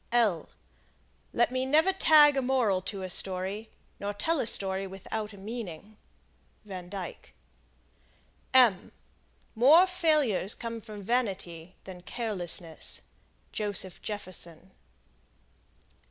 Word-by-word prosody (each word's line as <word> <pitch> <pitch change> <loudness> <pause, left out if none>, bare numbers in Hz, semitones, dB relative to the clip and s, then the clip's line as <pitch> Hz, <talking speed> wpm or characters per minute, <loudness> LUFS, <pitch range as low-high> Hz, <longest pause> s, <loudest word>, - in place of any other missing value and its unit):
Lord, 215 -9 +2 0.8
let 240 +1 +2
me 255 0 -1
never 310 +8 +3
tag 300 -6 +6
a 270 - +1
moral 245 -8 +1
to 195 0 -6
a 185 - -5
story, 190 +4 0 0.3
nor 200 0 -4
tell 320 +9 0
a 230 - 0
story 195 -2 +3
without 210 +3 -6
a 200 - -13
meaning. 210 -2 -8 0.7
Van 185 -3 -8
Dyke. 190 -2 -8 2.2
More 290 +10 +7
failures 305 - +1
come 230 -1 -6
from 215 -2 -10
vanity 190 -7 -3
than 185 -2 -10
carelessness. 180 -7 -2 0.5
Joseph 205 -3 -2
Jefferson. 185 -4 -7
205 Hz, 105 wpm, -28 LUFS, 185-245 Hz, 2.2 s, More